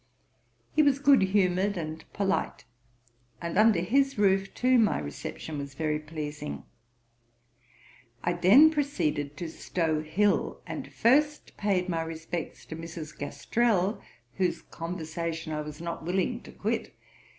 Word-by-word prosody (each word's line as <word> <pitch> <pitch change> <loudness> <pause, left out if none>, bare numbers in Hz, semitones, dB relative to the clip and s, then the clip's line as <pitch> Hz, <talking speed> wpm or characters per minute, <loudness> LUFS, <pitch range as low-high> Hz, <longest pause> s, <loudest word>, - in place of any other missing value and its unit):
He 310 - +6
was 285 -2 +4
good 280 -3 +5
humoured 190 0 +2
and 160 -1 -5
polite; 195 -1 -1 0.7
and 170 0 -4
under 215 -3 +5
his 270 +8 +2
roof 195 -1 +3
too 255 0 +4
my 220 - +3
reception 75 - -6
was 140 -1 -7
very 150 0 0
pleasing. 150 - -6 1.6
I 175 - +1
then 210 - +7
proceeded 155 - -1
to 170 - -4
Stow 160 -1 -1
hill, 185 +7 +1
and - - -6
first 295 +5 +2
paid 190 -3 0
my 165 -3 -1
respects 165 0 -5
to 160 - -7
Mrs. 165 -2 -7
Gastrell, 205 +7 0 0.4
whose 185 -2 0
conversation 165 -1 -4
I 150 - -2
was 150 +1 -8
not 170 -1 -5
willing 190 +8 -1
to - - -12
quit. 225 +3 -3
175 Hz, 130 wpm, -28 LUFS, 160-210 Hz, 1.6 s, then